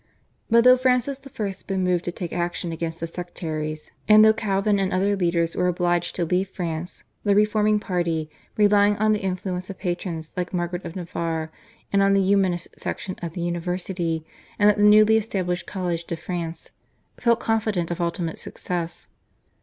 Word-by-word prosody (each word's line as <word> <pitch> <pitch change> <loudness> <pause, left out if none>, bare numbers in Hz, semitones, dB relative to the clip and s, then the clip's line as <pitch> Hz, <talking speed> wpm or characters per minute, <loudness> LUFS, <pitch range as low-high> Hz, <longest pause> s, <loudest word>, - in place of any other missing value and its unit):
But 230 0 +5
though 250 +1 +8
Francis 255 +2 +1
I. 265 -5 -6
had 195 -1 -6
been 190 -1 -1
moved 180 -1 +1
to 175 - -1
take 175 -1 -6
action 175 0 -2
against 165 0 -4
the 165 - -2
sectaries, 155 -3 -5 0.2
and 215 0 +8
though 220 - +7
Calvin 200 -1 +1
and 190 -1 0
other 195 +2 +2
leaders 170 -3 0
were 180 - +1
obliged 175 -1 0
to 175 - 0
leave 185 +3 0
France, 170 -2 -5 0.2
the 205 -1 +3
reforming 210 0 +3
party, 170 -6 -1 0.3
relying 205 0 +4
on 215 +1 +3
the 210 - -1
influence 185 -1 -3
of 195 - -7
patrons 175 -3 -4
like 180 0 -3
Margaret 175 +1 -2
of 165 - -7
Navarre 165 -3 -3 0.4
and 200 - +4
on 195 0 +4
the 195 - +3
Humanist 190 -3 +1
section 185 - -4
at 170 -2 -5
the 175 - -5
university 175 -1 -2 0.3
and 210 0 +6
at 210 - -4
the - - +1
newly 215 +1 +7
established 185 -5 -2
College 175 -3 -3
de 170 - -3
France, 170 0 -5 0.5
felt 235 -1 +2
confident 215 -7 0
of 175 - -3
ultimate 170 -1 -2
success. 170 -2 -5
180 Hz, 175 wpm, -24 LUFS, 170-205 Hz, 0.5 s, though